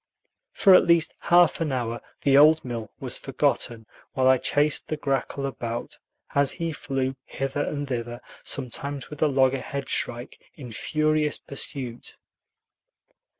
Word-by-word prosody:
For 195 Hz, -, +6 dB
at 185 Hz, -, +6 dB
least 170 Hz, -2 st, +3 dB
half 175 Hz, 0 st, +4 dB
an 155 Hz, -3 st, 0 dB
hour 120 Hz, -2 st, -2 dB, 0.2 s
the 140 Hz, -1 st, +4 dB
old 155 Hz, +2 st, +6 dB
mill 115 Hz, -4 st, -5 dB
was -, -, -3 dB
forgotten, 115 Hz, -2 st, -1 dB, 0.3 s
while 130 Hz, -1 st, +2 dB
I 130 Hz, -1 st, +5 dB
chased 145 Hz, +1 st, +1 dB
the 155 Hz, -, -3 dB
grackle 140 Hz, -1 st, -2 dB
about, 120 Hz, -3 st, -5 dB, 0.3 s
as 140 Hz, -1 st, +3 dB
he 165 Hz, -2 st, -3 dB
flew 135 Hz, -2 st, -2 dB
hither 135 Hz, +1 st, -3 dB
and 145 Hz, -1 st, -3 dB
thither, 120 Hz, -2 st, -4 dB, 0.2 s
sometimes 140 Hz, +2 st, -3 dB
with 150 Hz, -, -9 dB
a 155 Hz, -, +5 dB
loggerhead 135 Hz, 0 st, 0 dB
shrike 120 Hz, +2 st, -2 dB, 0.2 s
in 125 Hz, -6 st, -9 dB
furious 155 Hz, +4 st, 0 dB
pursuit. 130 Hz, -3 st, -6 dB
135 Hz, 140 wpm, -25 LUFS, 125-150 Hz, 0.3 s, For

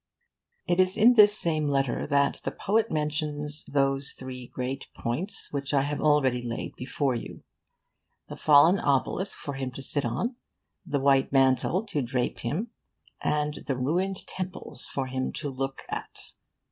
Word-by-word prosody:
It 175 Hz, 0 st, +1 dB
is 185 Hz, 0 st, +3 dB
in 230 Hz, +3 st, +7 dB
this 210 Hz, -3 st, +7 dB
same 155 Hz, -3 st, +1 dB
letter 135 Hz, -3 st, 0 dB
that 140 Hz, -1 st, +2 dB
the -, -, -1 dB
poet 220 Hz, +3 st, 0 dB
mentions 150 Hz, -1 st, -2 dB
those 135 Hz, -1 st, +1 dB
three 125 Hz, -1 st, -8 dB
great 130 Hz, +2 st, -4 dB
points 170 Hz, -, -4 dB
which 140 Hz, 0 st, -2 dB
I 135 Hz, -, +4 dB
have 145 Hz, +1 st, -3 dB
already 140 Hz, -5 st, +3 dB
laid 120 Hz, -1 st, -5 dB
before 135 Hz, +1 st, -1 dB
you: 120 Hz, -, -7 dB, 0.8 s
the -, -, -7 dB
fallen 155 Hz, +6 st, +6 dB
obelisk 140 Hz, +7 st, 0 dB
for 145 Hz, -, -5 dB
him 135 Hz, -1 st, -3 dB
to 135 Hz, -, -7 dB
sit 145 Hz, +1 st, 0 dB
on, 230 Hz, -, -2 dB, 0.5 s
the 150 Hz, -6 st, -1 dB
white 135 Hz, 0 st, +3 dB
mantle 135 Hz, +9 st, +3 dB
to 185 Hz, -9 st, -2 dB
drape 125 Hz, 0 st, -2 dB
him, 175 Hz, -, -3 dB, 0.5 s
and 150 Hz, 0 st, -1 dB
the 135 Hz, -2 st, 0 dB
ruined 180 Hz, +9 st, -1 dB
temples 185 Hz, -1 st, -6 dB
for 135 Hz, -, -3 dB
him 130 Hz, 0 st, -2 dB
to 145 Hz, -, -4 dB
look 135 Hz, +1 st, -4 dB
at. -, -, -7 dB
145 Hz, 160 wpm, -27 LUFS, 135-170 Hz, 0.8 s, in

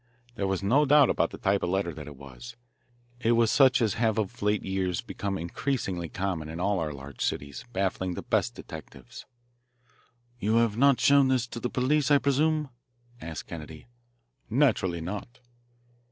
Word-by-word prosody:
There 100 Hz, -4 st, -2 dB
was 95 Hz, 0 st, -1 dB
no 130 Hz, +9 st, +4 dB
doubt 145 Hz, -1 st, +5 dB
about -, -, +1 dB
the -, -, -9 dB
type 100 Hz, 0 st, +1 dB
of 90 Hz, -, -1 dB
letter 95 Hz, -2 st, -1 dB
that 75 Hz, 0 st, -9 dB
it 75 Hz, -, -9 dB
was. 70 Hz, -, -11 dB, 0.6 s
It 120 Hz, -1 st, +2 dB
was 115 Hz, -1 st, +3 dB
such 130 Hz, -3 st, +5 dB
as 110 Hz, -, +1 dB
have 110 Hz, -1 st, +1 dB
of 110 Hz, +2 st, -3 dB
late 105 Hz, 0 st, +1 dB
years 95 Hz, -3 st, -1 dB
become 100 Hz, -1 st, -4 dB
increasingly 90 Hz, -, -3 dB
common 90 Hz, -5 st, -3 dB
in 80 Hz, +2 st, -6 dB
all 100 Hz, +1 st, +1 dB
our 80 Hz, -2 st, -2 dB
large 70 Hz, -1 st, -7 dB
cities, 70 Hz, -, -3 dB
baffling 95 Hz, -3 st, -1 dB
the -, -, -6 dB
best -, -, 0 dB
detectives. 65 Hz, -2 st, -11 dB, 1.1 s
"You 110 Hz, +1 st, +1 dB
have 115 Hz, -2 st, +3 dB
not 140 Hz, +2 st, +4 dB
showed 140 Hz, -1 st, +5 dB
this 130 Hz, -2 st, +2 dB
to -, -, -6 dB
the 125 Hz, -, -2 dB
police, 135 Hz, +3 st, +1 dB
I 145 Hz, -, +6 dB
presume?" 150 Hz, +2 st, +1 dB, 0.5 s
asked 80 Hz, 0 st, -6 dB
Kennedy. 80 Hz, -2 st, -9 dB, 0.6 s
"Naturally 110 Hz, -, +2 dB
not." 100 Hz, +7 st, -6 dB
100 Hz, 170 wpm, -27 LUFS, 85-125 Hz, 1.1 s, I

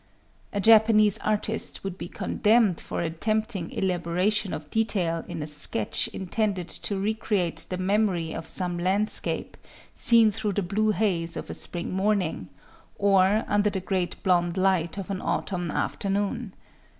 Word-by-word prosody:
A 200 Hz, -, -2 dB
Japanese 215 Hz, -1 st, +5 dB
artist 215 Hz, +1 st, -1 dB
would 195 Hz, -2 st, -4 dB
be 185 Hz, -, -7 dB
condemned 210 Hz, -1 st, +1 dB
for -, -, -4 dB
attempting 195 Hz, +3 st, -2 dB
elaboration 185 Hz, +3 st, -1 dB
of 150 Hz, -1 st, -7 dB
detail 185 Hz, -7 st, 0 dB
in 165 Hz, -3 st, -5 dB
a -, -, -4 dB
sketch 150 Hz, -7 st, +1 dB
intended 190 Hz, -1 st, -2 dB
to 200 Hz, -, -3 dB
recreate 195 Hz, -6 st, -1 dB
the 185 Hz, -, -3 dB
memory 185 Hz, -4 st, 0 dB
of 165 Hz, 0 st, -6 dB
some 175 Hz, 0 st, -1 dB
landscape 195 Hz, +4 st, -1 dB, 0.4 s
seen 230 Hz, -2 st, +7 dB
through 210 Hz, -1 st, -3 dB
the 200 Hz, -, -1 dB
blue 210 Hz, +5 st, 0 dB
haze 185 Hz, -6 st, 0 dB
of -, -, -6 dB
a -, -, -4 dB
spring 175 Hz, -1 st, -5 dB
morning, 190 Hz, -, -1 dB, 0.5 s
or 200 Hz, +1 st, +3 dB
under 205 Hz, 0 st, +2 dB
the 195 Hz, -, -3 dB
great 185 Hz, -1 st, -2 dB
blond 175 Hz, -1 st, +1 dB
light 185 Hz, -3 st, +1 dB
of 195 Hz, 0 st, -5 dB
an 190 Hz, -, -3 dB
autumn 175 Hz, -3 st, -2 dB
after 195 Hz, -, -2 dB
noon. 205 Hz, +2 st, -2 dB
195 Hz, 150 wpm, -26 LUFS, 175-210 Hz, 0.5 s, seen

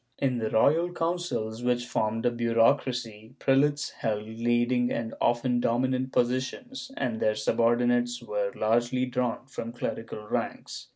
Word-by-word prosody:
In 130 Hz, -3 st, 0 dB
the 110 Hz, -1 st, -1 dB
royal 160 Hz, +11 st, +3 dB
councils, 165 Hz, -10 st, -2 dB
which 120 Hz, 0 st, +1 dB
formed 115 Hz, -1 st, -1 dB
a 120 Hz, -, +4 dB
bureaucracy, 115 Hz, -1 st, +1 dB
prelates 145 Hz, +2 st, +2 dB
held 105 Hz, -2 st, -2 dB
leading 120 Hz, +2 st, +1 dB
and 115 Hz, -1 st, -3 dB
often 120 Hz, +1 st, +2 dB
dominant 130 Hz, +2 st, 0 dB
positions, 130 Hz, -, -1 dB
and 120 Hz, -4 st, -1 dB
their 110 Hz, -, +2 dB
subordinates 120 Hz, +2 st, +2 dB
were 105 Hz, -4 st, -2 dB
largely 120 Hz, +3 st, +1 dB
drawn 125 Hz, -1 st, -2 dB
from 115 Hz, -3 st, -6 dB
clerical 115 Hz, -3 st, -5 dB
ranks. -, -, -4 dB
120 Hz, 130 wpm, -28 LUFS, 115-130 Hz, -, a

